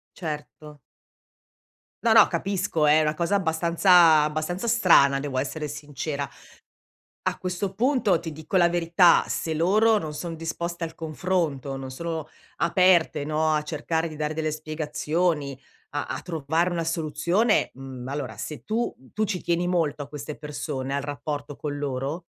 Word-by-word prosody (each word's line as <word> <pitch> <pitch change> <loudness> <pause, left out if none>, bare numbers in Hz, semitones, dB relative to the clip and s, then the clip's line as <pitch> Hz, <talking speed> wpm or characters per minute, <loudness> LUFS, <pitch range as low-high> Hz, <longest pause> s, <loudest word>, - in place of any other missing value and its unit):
Certo. 150 -2 -7 1.2
No, 230 - +5
no, 220 -2 +8
capisco, 175 -3 -1
è 150 +1 +6
una 150 0 +1
cosa 170 +5 +1
abbastanza 170 -2 +5
abbastanza 155 +8 -2
strana, 170 -11 +5
devo 140 -2 -3
essere 150 +3 -3
sincera. 145 0 -4 1.0
A - - 0
questo 185 +1 -3
punto 240 - +2
ti 165 -2 -6
dico 160 +5 -1
la 175 - +5
verità, 170 +1 +4
se 160 - -2
loro 215 +7 +4
non 155 -6 -3
sono 165 +2 -5
disposte 170 +1 -4
al 160 - -7
confronto, 160 -4 -2
non 135 -1 -6
sono 160 +3 -4 0.3
aperte, 170 -4 +3
no, 155 +1 +1
a 150 - +1
cercare 160 +2 -2
di 155 - -9
dare 150 0 -2
delle 155 -1 -1
spiegazioni, 155 -1 -2 0.4
a - - -1
a - - -5
trovare 165 0 -1
una 170 -2 -2
soluzione, 165 +7 +1
mhmm, 130 -1 -8
allora 140 -1 -4
se 145 -6 -6
tu, 230 +2 -1
mhmm 130 - -20
tu 215 - +1
ci 190 -4 -2
tieni 175 +1 0
molto 165 -5 0
a 145 - -8
queste 145 0 -7
persone, 145 -2 -4
al 140 - 0
rapporto 145 0 -5
con 145 -1 -4
loro? 140 +4 -3
160 Hz, 155 wpm, -25 LUFS, 145-175 Hz, 1.2 s, no